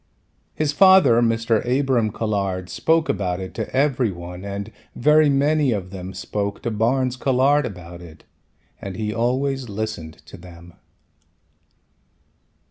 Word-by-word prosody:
His 150 -2 -1
father 185 -9 +6
Mr. 115 -1 +1
Abram 125 -3 +1
Colhard 100 -4 -2
spoke 165 0 +1
about 90 -2 -1
it 95 -1 -7
to - - -4
every 135 -3 +1
one 90 +1 -9
and 100 +2 -6 0.2
very 150 +3 +4
many 145 0 +2
of 95 -3 -5
them 95 -1 -7
spoke 100 +2 -4
to 120 - -2
Barnes 125 +4 0
Colhard 135 +2 +2
about 90 -4 -10
it 80 -3 -14 0.6
and 95 -1 -6
he 105 +1 -3
always 130 +2 -1
listened 105 -6 -5
to - - -12
them. 85 0 -14
115 Hz, 130 wpm, -22 LUFS, 95-135 Hz, 0.6 s, father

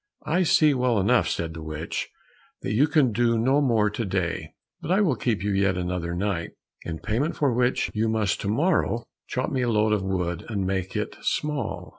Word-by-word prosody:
"I 175 +5 +1
see 155 -3 +4
well 125 -4 +1
enough," 120 +6 +3
said 80 -1 -2
the 80 - -8
witch, 80 +1 -4 0.5
"that - - -2
you 135 +8 +4
can 145 -5 +3
do 115 +1 +2
no 130 +6 +3
more 115 -6 +3
to 110 +2 -3
day, 95 -4 -2 0.3
but - - -6
I 190 +3 +3
will 175 -11 +3
keep 110 -4 -1
you 105 - 0
yet 95 -1 +2
another 90 -1 -2
night, 95 -2 -2 0.3
in 80 -1 -5
payment 125 - -1
for 140 -4 +1
which 125 +1 +1
you 110 +1 +1
must 110 -3 0
to - - -3
morrow 125 - +1 0.2
chop 130 +1 -2
me 130 - 0
a 120 - +1
load 105 -1 +2
of 105 - +1
wood, 90 -3 -2
and 100 -4 -1
make 95 +1 -2
it 105 0 -3
small." 110 - -2
110 Hz, 205 wpm, -25 LUFS, 95-130 Hz, 0.5 s, see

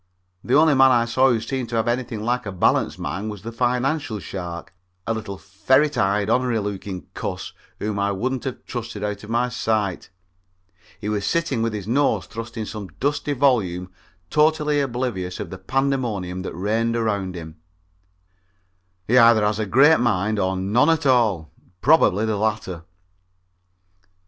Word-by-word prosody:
The 125 - +1
only 155 +1 +5
man 135 -1 +6
I 120 -2 +3
saw 130 +3 +3
who 120 -3 +2
seemed 125 +1 -4
to 120 - -3
have 115 +1 0
anything 120 -2 -2
like 125 0 -1
a - - -3
balanced 95 - +1
mind 105 +3 -4
was 105 -2 -8
the 115 - -5
financial 125 +1 0
shark, 90 -2 -7 0.3
a 115 - 0
little 105 -3 -5
ferret 130 +11 +1
eyed, 100 +1 +1
onery 125 0 +1
looking 100 -2 -5
cuss - - -5 0.2
whom 105 -1 -3
I 100 0 +1
wouldn't 125 +7 -2
have 130 - -5
trusted 115 -4 -6
out 105 -1 -3
of 105 - -10
my 120 +2 +1
sight. 110 -6 -1 0.9
He 105 - -5
was 105 -1 -1
sitting 170 -8 0
with 115 0 0
his 105 -2 -5
nose 140 +5 +1
thrust 115 0 -8
in 110 - -3
some 105 -2 -7
dusty 145 +1 0
volume 100 -10 +1 0.4
totally 150 -1 +2
oblivious 120 -9 -3
of - - -6
the 95 - -7
pandemonium 115 -6 -1
that 95 - -6
reigned 110 +5 0
around 100 -5 -1
him. 80 -1 -9 1.5
He 125 +3 +5
either 115 -3 +6
has 105 0 0
a 110 - -1
great 145 +9 +5
mind 110 -2 +1
or 95 0 0
none 105 - +2
at 160 -2 +1
all 110 - +2 0.3
probably 110 - +4
the 110 -2 -1
latter. 100 -6 -2
110 Hz, 165 wpm, -22 LUFS, 100-125 Hz, 1.5 s, man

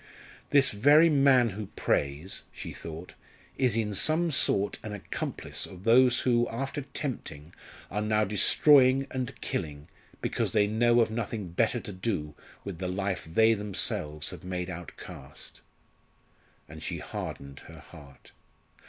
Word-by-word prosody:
"This 140 -2 +4
very 145 +10 +5
man 135 -4 +5
who 105 +1 -6
prays," 70 +7 -1
she - - -8
thought, 85 +2 -9 0.5
"is 125 -4 +2
in 105 -2 -1
some 160 - +2
sort 100 -7 +1
an 105 - -6
accomplice 105 - -5
of 90 0 -12
those 125 +2 +5
who, 120 -1 +2
after 135 +5 -4
tempting, 125 - -6 0.4
are 105 - -1
now 105 0 +2
destroying, 130 +6 +5
and 130 -2 -4
killing, 75 -1 -4 0.3
because - - -2
they 105 -2 +4
know 120 +3 +3
of 110 - +1
nothing 110 -4 -4
better 115 +7 +1
to 105 - -7
do 90 -6 -3 0.3
with 95 -4 -7
the 95 - -2
life 95 0 -2
they 110 +8 +4
themselves 75 -8 -2
have - - -10
made 90 0 -4
outcast." 75 -4 -11 1.1
And 80 +1 -11
she - - -4
hardened 70 -1 -7
her - - -12
heart. 70 -2 -16
105 Hz, 140 wpm, -28 LUFS, 90-125 Hz, 1.1 s, very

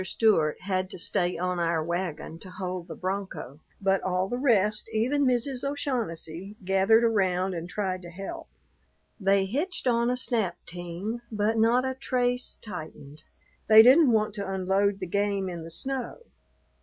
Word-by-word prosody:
Stewart 185 -6 +2
had 185 -1 -1
to - - -8
stay 175 +1 +2
on 180 0 -1
our 165 -2 +1
wagon 170 -1 -4
to 185 - -9
hold 180 -2 -5
the - - -7
bronco, 190 -7 -5 0.2
but 195 -1 +2
all 185 0 0
the 245 +5 -3
rest, 215 -5 +2
even 260 +6 +1
Mrs. 250 +1 0
O'Shaughnessy, 210 - -3
gathered 195 +4 +4
around 190 -4 +1
and 170 0 -5
tried 185 -2 -2
to 175 - -9
help. 195 - -7 0.7
They 195 -1 +3
hitched 295 - -3
on 235 -1 +2
a 250 - 0
snap 230 -7 0
team, 175 +7 -5
but 215 +1 0
not 235 +3 +3
a 260 - -1
trace 250 -1 -1
tightened. 155 -6 -9 0.5
They 220 0 +9
didn't 265 +3 +7
want 215 -2 +1
to 200 -2 -4
unload 195 +1 +1
the - - -2
game 200 +1 0
in 170 -2 -5
the 165 - -8
snow. 260 +8 -4
195 Hz, 160 wpm, -27 LUFS, 180-235 Hz, 0.7 s, They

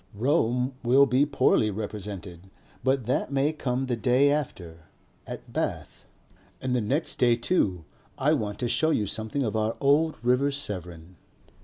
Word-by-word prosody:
Rome 125 +1 +1
will 130 +3 +5
be 135 +3 +2
poorly 130 -6 +3
represented, 100 -3 -7 0.3
but 130 -1 +1
that 125 +3 -1
may 140 +3 +1
come 130 -3 -2
the 125 -2 -1
day 125 +5 +3
after 85 - -4 0.4
at - - -9
Bath. - - -4 0.5
And 130 -1 -1
the 125 - +1
next 140 +10 -1
day 120 -2 +4
too 105 - 0 0.3
I - - +2
want 105 -1 -2
to 120 - 0
show 155 +6 +1
you 110 -9 +1
something 110 +7 -3
of 110 -3 -2
our 110 +1 0
old 150 +3 +2
River 125 +3 +3
Severn. 90 - -6
125 Hz, 155 wpm, -26 LUFS, 105-140 Hz, 0.5 s, will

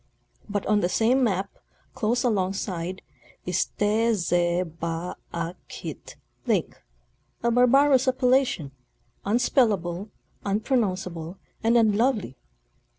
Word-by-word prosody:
But 205 -1 -2
on 210 0 +3
the 175 - +1
same 240 +7 +3
map, 195 -4 +1 0.5
close 235 +2 0
along 195 -6 +1
side, 185 -1 -4 0.4
is 180 0 +1
" - - -41
Te 220 +3 +2
ze 175 -2 +1
ba 165 +1 -5 0.2
a 170 0 -3
kit - - -8 0.3
Lake," - - 0 0.6
a 235 - +2
barbarous 260 +2 +5
appellation—unspellable, 205 - 0 0.3
unpro 215 +6 +1
nounceable 185 -5 -3 0.3
and 230 +1 +4
unlovely. 220 - +2
205 Hz, 105 wpm, -25 LUFS, 175-235 Hz, 0.6 s, barbarous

